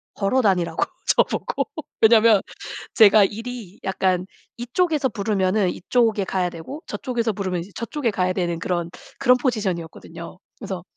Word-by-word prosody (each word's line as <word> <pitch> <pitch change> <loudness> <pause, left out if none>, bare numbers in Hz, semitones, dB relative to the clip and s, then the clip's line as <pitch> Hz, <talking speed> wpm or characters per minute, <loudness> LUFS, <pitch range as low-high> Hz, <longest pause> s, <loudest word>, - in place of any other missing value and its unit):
걸어다니라고 195 -5 +1 0.3
저보고. - - 0 0.4
왜냐하면 220 -2 +6 0.5
제가 215 -2 +7
일이 225 -2 -7
약간 185 -1 0 0.3
이쪽에서 275 +4 0
부르면은 200 -3 0
이쪽에 220 +2 +1
가야 185 -1 -1
되고 175 - -8
저쪽에서 235 -4 -2
부르면 185 -3 -2
이제 185 +4 -11
저쪽에 235 +1 -2
가야 185 -2 0
되는 175 -3 -2
그런 175 -1 -2 0.3
그런 250 0 +5
포지션이었거든요. 180 - -4 0.2
그래서 185 -4 -6
200 Hz, 355 characters per minute, -22 LUFS, 180-235 Hz, 0.5 s, 제가